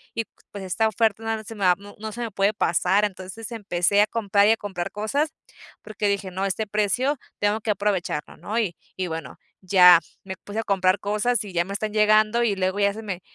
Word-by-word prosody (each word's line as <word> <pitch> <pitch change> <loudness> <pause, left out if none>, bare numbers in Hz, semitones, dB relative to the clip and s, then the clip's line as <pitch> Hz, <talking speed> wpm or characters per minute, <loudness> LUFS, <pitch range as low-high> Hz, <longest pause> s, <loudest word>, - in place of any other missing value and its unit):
y 230 - 0 0.3
pues 200 -1 -7
esta 205 +4 +1
oferta 220 0 0
no 225 -1 -2
se 220 - -9
me 200 -2 -2 0.3
no 220 0 -5
se 240 +3 -7
me 230 -2 -3
puede 200 +2 +1
pasar". 190 +2 +2
Entonces, 200 +3 -7
empecé 200 -3 +1
a 210 - +3
comprar 205 -3 +2
y - - +6
a 225 - +3
comprar 195 -3 -5
cosas, 275 +9 -1 0.5
porque 210 -1 -3
dije: 200 -1 -1
"No, 190 +2 -2
este 195 +3 -2
precio, 215 +8 0 0.2
tengo 205 +2 +1
que 215 - 0
aprovecharlo", 200 -7 -2
¿no? 215 - -4
Y 195 -7 -1 0.2
y 185 - -1
bueno, 160 -1 -6 0.2
ya 180 -2 +7 0.2
me 190 -1 -6
puse 205 +2 -5
a - - -1
comprar 190 -2 +2
cosas 210 +3 0
y 195 - -9
ya 170 0 +2
me 195 - -6
están 210 +1 -3
llegando, 215 +2 +4
y 215 -4 +1
luego 190 +1 -1
ya 200 0 +3
se 220 +2 -8
me, 190 -4 -5
205 Hz, 215 wpm, -24 LUFS, 190-220 Hz, 0.5 s, ya